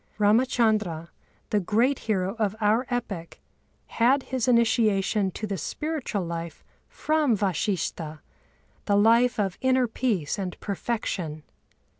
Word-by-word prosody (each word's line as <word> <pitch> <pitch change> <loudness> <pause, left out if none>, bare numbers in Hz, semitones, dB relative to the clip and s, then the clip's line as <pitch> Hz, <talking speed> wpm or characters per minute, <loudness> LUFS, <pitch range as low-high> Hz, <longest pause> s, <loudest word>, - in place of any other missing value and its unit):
Râmachandra, 215 -6 +2 0.4
the 210 - +3
great 230 +8 +1
hero 190 -2 +1
of 210 -2 0
our 220 +4 +2
epic, 200 -9 -4 0.5
had 255 +4 +2
his 260 -2 -2
initiation 220 -4 +2
to 215 - -4
the 195 -2 -3
spiritual 300 - -3
life 170 0 -6 0.3
from 305 -7 +1
Vashishtha, 170 -4 -2 0.7
the 205 - +2
life 230 +3 +4
of 195 -3 -1
inner 260 -1 +3
peace 215 - -1
and 185 -2 -4
perfection. 190 -7 -3
215 Hz, 115 wpm, -26 LUFS, 190-240 Hz, 0.7 s, life